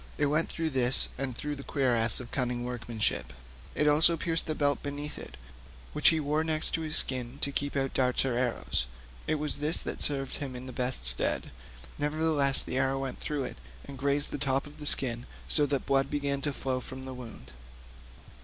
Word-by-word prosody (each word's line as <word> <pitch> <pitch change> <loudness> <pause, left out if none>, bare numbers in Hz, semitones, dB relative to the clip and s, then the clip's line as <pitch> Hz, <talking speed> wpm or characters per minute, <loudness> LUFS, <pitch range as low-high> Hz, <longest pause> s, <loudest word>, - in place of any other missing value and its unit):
It 150 - +1
went 150 +3 +1
right - - -9
through 165 -1 -1
this 130 -1 +5
and 130 -2 -5
through 150 0 -4
the 140 - -9
cuirass 120 -7 +2
of 125 -2 -9
cunning 125 -2 -2
workmanship; 120 -3 -2 0.4
it 150 - +1
also 155 +3 +5
pierced 165 0 +1
the 155 - -2
belt 145 -1 0
beneath 145 +1 -5
it, - - -10 0.6
which 150 - +5
he 160 - +1
wore 150 +1 0
next 155 -1 -1
his 160 -1 -2
skin 125 0 -1
to 140 - +3
keep 145 +1 -2
out 135 -1 -1
darts 125 0 +1
or 130 -3 -1
arrows; 120 - -1 0.4
it - - +1
was 150 0 +1
this 150 +3 +3
that - - -5
served 135 -2 0
him 135 -3 -6
in 125 +1 -8
the 130 - -8
best 125 - -3
stead, - - +6 0.5
nevertheless 150 -2 +1
the 130 - -3
arrow 135 0 +1
went 135 -1 -5
through 145 -2 -2
it 125 - -7 0.3
and 140 -2 -10
grazed 140 +1 0
the - - -4
top 135 -1 0
of 145 - -14
the 150 - -6
skin, 120 -3 +2 0.2
so 150 -2 +3
that 140 -1 -2
blood 135 0 +1
began 140 -1 -2
flowing 135 -3 -2
from 130 +1 -9
the 130 - -6
wound. 120 - -11
135 Hz, 200 wpm, -29 LUFS, 125-150 Hz, 0.6 s, stead